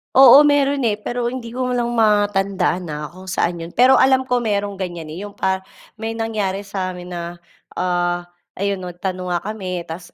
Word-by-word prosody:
Oo, 270 +2 +9
meron 285 -2 +2
eh. 215 - +3
Pero 240 +1 -3
hindi 240 -1 -4
ko 250 +1 -2
lang 240 -1 0
matandaan 200 -4 +2
ha 150 0 -5
kung 185 +2 -13
saan 175 -1 -1
yun. 170 - -11
Pero 255 +2 +6
alam 260 0 +4
ko 250 - +3
merong 205 -4 -1
ganiyan 175 -4 -5
eh, 160 - -7
yung 205 - -10
pa 190 -1 -1 0.3
may 225 +1 -4
nangyari 215 -4 -2
sa'min 185 -3 -5
na, 175 0 -6 0.3
ah, 175 -1 0 0.3
ayun, 200 0 -1
'no, 180 -1 -7
nagtanong 185 0 -4
nga 175 - +1
kami 190 -4 -4
tapos 165 +2 -8
195 Hz, 185 wpm, -20 LUFS, 180-230 Hz, 0.3 s, Oo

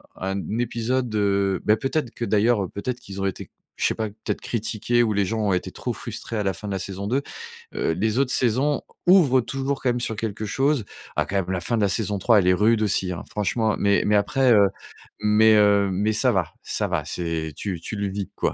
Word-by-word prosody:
un 95 +1 -3 0.2
épisode, 120 0 -1
heu 100 -2 +1
beh 105 - +5
peut-être 135 +1 -2
que - - -5
d'ailleurs 105 -3 +2
peut-être 125 +4 -4
qu'ils 95 0 -7
ont - - 0
été 95 - -4 0.3
je - - -1
sais - - -1
pas, 110 - -2
peut-être 105 +2 -5
critiqués 115 +1 0
ou 110 -3 +1
les 100 0 +1
gens 110 +3 -2
ont 95 - +2
été 90 - -2
trop - - -4
frustrés 115 - -6
à 105 - 0
la 95 -1 0
fin 105 - -8
de 100 - -3
la 95 - -1
saison 95 +2 -5
2. 135 +6 0 0.5
Heu, - - 0
les 110 +7 0
autres 135 -2 +1
saisons 130 +5 +1 0.2
ouvrent 155 -9 +6
toujours 135 +3 -3
quand 130 - +1
même 120 0 0
sur 115 -2 -3
quelque 110 -1 -4
chose. 135 +1 +1 0.3
Ah, - - +1
quand 100 - -2
même, 95 -2 -1
la 95 - -1
fin 105 +7 -1
de - - 0
la 100 - +3
saison 105 0 0
3, 110 +3 +4
elle 90 - +1
est 90 - +5
rude 110 +4 +3
aussi, 95 -3 +1
hein? 85 - -5
Franchement. 105 +2 0
Mais 100 0 +3
mais 105 - +3
après, 130 +4 +3
heu 100 -2 +6 0.5
mais, 110 +1 +5
heu 100 -1 +4
mais 105 +4 0
ça - - +3
va - - -1
ça - - -1
va - - -1
c'est 80 -3 -3
tu 95 -1 -4
tu 110 - -5
le 100 -1 -2
vis 100 -1 -4
quoi. - - 0
105 Hz, 235 wpm, -23 LUFS, 100-120 Hz, 0.5 s, ouvrent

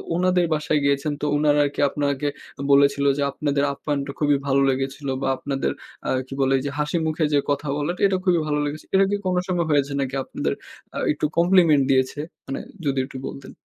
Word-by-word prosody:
ওনাদের 180 0 +2
বাসায় 150 0 +1
গিয়েছেন, 140 +1 +1
তো - - -1
উনারা 150 0 +3
আরকি 145 - -5
আপনাকে 140 0 -1 0.4
বলেছিল 140 0 +4
যে 145 - -1
আপনাদের 140 -1 -1
আপ্যায়নটা 140 -1 -3
খুবই 145 -2 +3
ভালো 135 0 +3
লেগেছিল 135 +2 -2
বা - - -1
আপনাদের 135 - -2 0.4
আ - - 0 0.2
কি 135 - -8
বলে, 135 0 +3
ওইযে 140 +1 -3
হাসিমুখে 155 +1 0
যে 145 - +5
কথা 145 +1 -1
বলাটা 150 +5 -2
এটা 190 - 0
খুবই 180 -3 +4
ভালো 150 0 0
লেগেছে। 145 +1 -5
এটা 195 0 +5
কি - - +2
কোন 185 -1 +1
সময় 175 -2 0
হয়েছে 145 -1 +2
নাকি 135 0 -2
আপনাদের - - -2 0.4
আ - - -3
একটু 150 - -1
compliment 170 -5 +5
দিয়েছে? 130 +2 +1 0.3
মানে 135 - -3 0.3
যদি 135 -1 +1
একটু 135 - -9
বলতেন। 135 - -9
145 Hz, 190 wpm, -23 LUFS, 140-155 Hz, 0.4 s, যে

